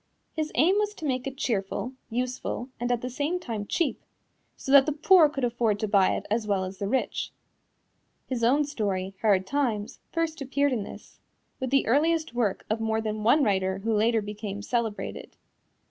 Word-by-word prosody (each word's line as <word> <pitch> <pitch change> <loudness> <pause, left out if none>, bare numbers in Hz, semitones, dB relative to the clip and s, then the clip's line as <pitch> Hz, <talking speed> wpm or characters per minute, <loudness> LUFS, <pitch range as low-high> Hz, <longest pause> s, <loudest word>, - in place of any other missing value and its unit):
His 310 -1 -2
aim 360 +10 +4
was 420 0 -1
to 325 - -7
make 255 -2 -1
it 270 0 -6
cheerful, 225 +1 -2 0.2
useful 250 +1 -3
and 245 +1 -1
at 240 -1 0
the 250 - -3
same 295 +8 -1
time 225 - -5
cheap, 335 -5 0 0.6
so 270 - -4
that 280 0 +8
the - - +2
poor 315 +2 +6
could 275 -3 -4
afford 235 -3 +1
to 215 - -1
buy 200 -2 +4
it - - -5
as 220 0 0
well 195 -2 +1
as 185 0 -6
the 200 - -2
rich. 260 +5 -1 0.9
His 250 -3 -3
own 280 +6 +4
story, 195 -9 -2
Hard 195 -4 +3
Times, 235 -6 -1
first 330 -2 -2
appeared 280 +1 +1
in 230 - -1
this, 200 - -10 0.4
with 260 - -2
the 275 +1 +3
earliest 315 +4 +2
work 230 -5 -1
of 220 +1 -1
more 220 0 0
than 215 -1 -3
one 245 +8 +4
writer 190 -3 +1
who 225 0 +1
later 220 +1 +2
became 205 -1 -6
celebrated. 230 -2 -3
240 Hz, 190 wpm, -27 LUFS, 210-280 Hz, 0.9 s, that